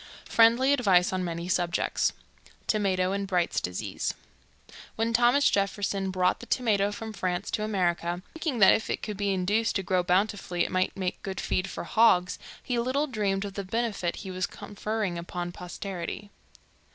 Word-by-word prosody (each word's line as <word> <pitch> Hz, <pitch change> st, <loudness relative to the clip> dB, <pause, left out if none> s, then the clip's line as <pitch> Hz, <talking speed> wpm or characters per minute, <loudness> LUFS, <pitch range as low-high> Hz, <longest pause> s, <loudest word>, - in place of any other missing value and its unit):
FRIENDLY 235 Hz, +4 st, +5 dB
ADVICE 190 Hz, -9 st, +3 dB
ON 185 Hz, -1 st, -1 dB
MANY 170 Hz, 0 st, -4 dB
SUBJECTS. 175 Hz, -2 st, +1 dB, 0.5 s
Tomato 190 Hz, -3 st, +1 dB
in 200 Hz, 0 st, -2 dB
Bright's 180 Hz, -3 st, +1 dB
Disease. 90 Hz, 0 st, -3 dB, 0.8 s
When 225 Hz, +1 st, 0 dB
Thomas 245 Hz, +5 st, +5 dB
Jefferson 195 Hz, 0 st, 0 dB
brought 185 Hz, -1 st, +1 dB
the 245 Hz, -, -10 dB
tomato 205 Hz, -5 st, +2 dB
from 220 Hz, +1 st, -6 dB
France 180 Hz, -3 st, -2 dB
to 210 Hz, -, -1 dB
America, 175 Hz, -4 st, -1 dB
thinking 320 Hz, -5 st, -2 dB
that 190 Hz, -, +9 dB
if 220 Hz, -, -1 dB
it -, -, -2 dB
could 210 Hz, -, -4 dB
be 200 Hz, 0 st, -1 dB
induced 205 Hz, +5 st, +1 dB
to 195 Hz, -, 0 dB
grow 185 Hz, 0 st, +2 dB
bountifully 180 Hz, -1 st, +1 dB
it -, -, -5 dB
might 185 Hz, +1 st, 0 dB
make 185 Hz, -2 st, -3 dB
good 190 Hz, -1 st, -5 dB
feed 185 Hz, +1 st, -1 dB
for -, -, -5 dB
hogs, 190 Hz, -4 st, +3 dB, 0.2 s
he 245 Hz, -2 st, -1 dB
little 260 Hz, +5 st, +1 dB
dreamed 205 Hz, -7 st, -1 dB
of 200 Hz, -, -6 dB
the 200 Hz, -, -4 dB
benefit 205 Hz, -4 st, -1 dB
he 190 Hz, -, -5 dB
was 185 Hz, 0 st, -1 dB
conferring 205 Hz, -3 st, -3 dB
upon 175 Hz, 0 st, -5 dB
posterity. 180 Hz, +2 st, -6 dB
195 Hz, 165 wpm, -28 LUFS, 180-220 Hz, 0.8 s, that